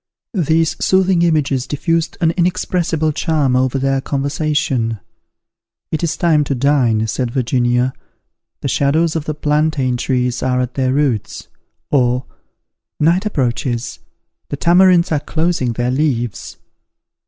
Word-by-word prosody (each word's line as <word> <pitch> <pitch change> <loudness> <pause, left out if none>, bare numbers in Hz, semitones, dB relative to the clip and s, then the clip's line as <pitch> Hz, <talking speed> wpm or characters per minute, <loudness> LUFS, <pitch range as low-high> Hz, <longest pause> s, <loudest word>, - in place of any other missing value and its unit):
These 165 -4 0
soothing 190 -2 +3
images 145 -6 +1
diffused 165 +3 -1
an 165 -1 +3
inexpressible 175 -2 0
charm 145 -4 0
over 130 +1 +1
their 135 0 0
conversation. 140 -5 -1 0.9
"It 160 - -2
is 170 -2 -1
time 160 -3 +3
to 140 - -1
dine," 125 -5 +2
said 120 +3 -2
Virginia, 125 0 0 0.7
"the - - -2
shadows 155 +5 +1
of 155 -2 -2
the 155 - -3
plantain 150 -4 0
trees 125 -1 -1
are 125 -1 0
at 125 0 -2
their 130 -1 0
roots:" 135 -6 -1 0.4
or, 125 -2 +2 0.7
"Night 175 +7 +2
approaches, 125 - -2 0.5
the 145 - -4
tamarinds 175 +1 +4
are 150 - +2
closing 155 -6 -1
their 120 +2 -1
leaves." 125 -6 -2
140 Hz, 125 wpm, -17 LUFS, 125-160 Hz, 0.9 s, tamarinds